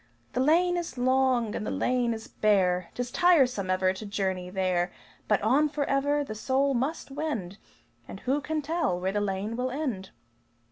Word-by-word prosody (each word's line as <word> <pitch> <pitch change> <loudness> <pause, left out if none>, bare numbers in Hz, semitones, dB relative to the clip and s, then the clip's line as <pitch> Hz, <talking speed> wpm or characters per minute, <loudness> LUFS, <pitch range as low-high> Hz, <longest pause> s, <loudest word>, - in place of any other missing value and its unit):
The - - -1
lane 345 +6 +3
is 335 -7 -5
long, 255 -3 +2
and - - -3
the - - -3
lane 245 -1 +1
is 220 -1 -5
bare, 185 -4 +1
'Tis 245 0 -3
tiresome 265 - +3
ever 185 0 +2
to 190 - -8
journey 190 -3 -2
there; 185 -1 0 0.4
But 210 -1 +2
on 280 +8 +3
forever 285 0 0
the 245 - -6
soul 270 +5 +1
must 270 +4 -2
wend 265 - -4 0.5
And - - -9
who 275 +3 0
can 310 +1 -2
tell 310 - 0
where 185 +1 -1
the 205 +1 -1
lane 205 +2 -2
will 250 +2 -1
end?" 250 -9 -3
245 Hz, 175 wpm, -28 LUFS, 195-280 Hz, 0.5 s, lane